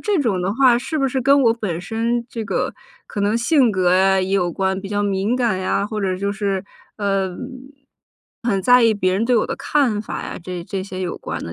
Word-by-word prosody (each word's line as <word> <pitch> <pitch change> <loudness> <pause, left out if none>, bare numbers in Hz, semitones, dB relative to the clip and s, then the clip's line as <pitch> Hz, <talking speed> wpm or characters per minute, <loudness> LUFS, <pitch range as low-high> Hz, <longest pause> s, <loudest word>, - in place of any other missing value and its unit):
这 415 -3 0
种 215 -9 0
的 190 +3 -1
话 250 -2 +5
是 310 +5 -4
不 275 - +2
是 265 0 -1
跟 275 +2 +4
我 230 -3 +5
本 210 -8 -3
身 230 +5 -1
这 230 - -4
个 200 - -1 0.3
可 205 - -5
能 205 +2 +2
性 245 +1 +3
格 185 -3 +1
啊 190 +1 +4
也 185 0 -2
有 185 -3 +1
关， 190 +2 -1
比 195 - -7
较 205 0 -1
敏 200 +4 0
感 235 -7 +1
呀， 190 +1 0
或 215 0 -4
者 190 -2 -1
就 200 +2 -2
是， 200 -2 -2 0.3
呃， 195 -3 -1 1.1
很 205 -5 +1
在 245 +4 +6
意 225 -1 +5
别 185 -3 +1
人 205 +4 +1
对 250 +1 +2
我 220 - +2
的 - - -4
看 255 -8 +1
法 210 - -5
呀， - - -6
这 180 0 -5
这 195 +1 -4
些 185 -1 -7
有 180 -2 -3
关 - - -5
的， 85 - -6
205 Hz, 250 characters per minute, -20 LUFS, 190-235 Hz, 1.1 s, 在